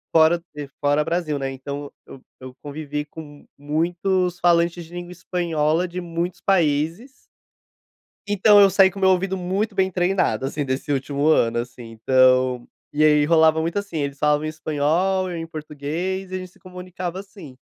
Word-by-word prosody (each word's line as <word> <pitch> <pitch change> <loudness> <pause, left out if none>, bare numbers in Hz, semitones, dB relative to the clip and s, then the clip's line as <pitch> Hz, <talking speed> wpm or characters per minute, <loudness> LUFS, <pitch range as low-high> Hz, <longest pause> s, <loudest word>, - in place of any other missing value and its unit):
fora 165 +2 +5
de 145 -1 -6
fora 145 +1 +2
Brasil, 165 -2 -2
né, 135 0 -3
então 140 +2 -7
eu - - -11
eu 130 - -18 0.3
eu 125 - -18
convivi 150 0 -5
com 150 -2 -12
muitos 175 +4 -1
falantes 170 0 +2
de 170 - -16
língua 175 0 -7
espanhola 170 -2 -1
de 180 +1 -6
muitos 170 0 -4
países 170 - 0 1.2
então, 205 0 +5
eu 195 - +7
saí 190 0 +5
com 195 - -9
o - - -8
meu 190 - +5
ouvido 190 +1 0
muito 195 +4 -2
bem 190 -1 +1
treinado, 180 -5 0
assim, 145 +2 -3
desse 130 +2 -3
último 140 +1 -1
ano, 120 -7 +3
assim, 120 0 -7
então, 130 +1 +2 0.3
e 150 - +2
aí 150 -1 +5
rolava 160 0 +4
muito, 165 +5 -1
assim, 200 -5 -6
eles 140 -1 -3
falavam 150 0 +2
espanhol, 160 +5 0
eu 170 - -5
em 165 0 -5
português, 160 +5 -5
e - - -3
a - - -1
gente 185 -1 -8
se - - -25
comunicava, 180 0 -7
assim. 190 - -12
165 Hz, 175 wpm, -22 LUFS, 145-180 Hz, 1.2 s, eu